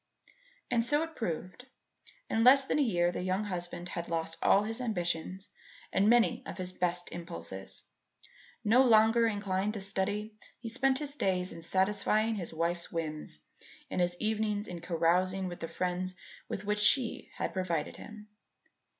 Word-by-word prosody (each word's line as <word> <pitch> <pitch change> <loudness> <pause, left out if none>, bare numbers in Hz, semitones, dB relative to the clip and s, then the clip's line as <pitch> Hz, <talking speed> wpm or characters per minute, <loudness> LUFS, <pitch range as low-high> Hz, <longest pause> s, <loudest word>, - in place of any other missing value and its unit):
And 230 -1 +3
so 295 +5 +2
it 325 -1 -7
proved. 185 +4 -4 0.6
In 225 - +1
less 270 +2 +7
than 300 - 0
a - - +4
year 175 -9 +2
the - - -4
young 185 +3 0
husband 175 -2 -5
had 170 0 -5
lost 165 -1 -2
all 200 - +5
his 225 +3 -4
ambitions 185 -4 -2 0.5
and 200 +3 +4
many 240 +1 +4
of - - -6
his 185 -1 -3
best 175 -1 -1
impulses. 95 - -4 0.8
No 240 +5 +5
longer 225 -1 +5
inclined 205 -1 -1
to - - -3
study, 200 +2 -1 0.3
he 235 - -6
spent 265 +3 +2
his 290 0 -2
days 185 -7 0
in 165 - -9
satisfying 205 +5 +2
his 190 -6 -4
wife's 170 +1 -1
whims 155 - -4 0.5
and - - 0
his 175 0 +1
evenings 215 -1 -1
in 175 -2 -7
carousing 180 +3 +1
with 175 -1 -7
the 165 - -4
friends 180 +1 -2 0.3
with 200 - -4
which 210 0 0
she 235 +3 +3
had - - -2
provided 170 -5 -2
him. 215 -1 -11
190 Hz, 160 wpm, -31 LUFS, 175-220 Hz, 0.8 s, less